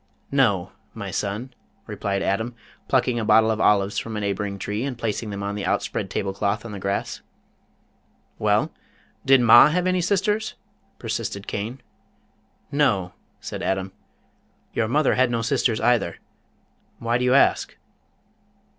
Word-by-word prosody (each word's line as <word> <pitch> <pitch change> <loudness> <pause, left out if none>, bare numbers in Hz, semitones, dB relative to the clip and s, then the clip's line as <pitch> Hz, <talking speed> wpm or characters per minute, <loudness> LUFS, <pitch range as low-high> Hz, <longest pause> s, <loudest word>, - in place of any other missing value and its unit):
"No, - - +2 0.2
my - - -5
son," 105 +6 -3 0.3
replied 100 -1 -2
Adam, 110 +5 -1 0.3
plucking 125 -2 +2
a - - -2
bottle 110 +1 +5
of 110 - -1
olives 100 -1 +3
from 110 -1 -5
a - - -1
neighboring 100 0 -2
tree, 105 +4 -3
and 135 -3 -3
placing 115 -1 -3
them 100 -1 -5
on 100 0 -2
the 100 -1 -4
outspread 90 - -1
table 95 -1 -2
cloth 100 +3 -1
on 115 - -7
the 100 - -6
grass. 100 +1 -3 1.2
"Well, - - +2 0.5
did 135 -1 +6
Ma 120 0 +8
have 180 +3 0
any 185 0 +2
sisters?" 205 +4 0 0.4
persisted 100 0 -4
Cain. 115 +6 -5 0.9
"No," 100 -11 +1 0.3
said - - -6
Adam. 95 0 -1 0.8
"Your 110 - 0
mother 145 +5 +2
had 130 0 +3
no 115 -1 -1
sisters, 115 0 +1
either. 120 -8 +1 0.8
Why 115 +1 0
do - - -1
you 125 +1 +3
ask?" 140 - +3
110 Hz, 145 wpm, -23 LUFS, 100-125 Hz, 1.2 s, Ma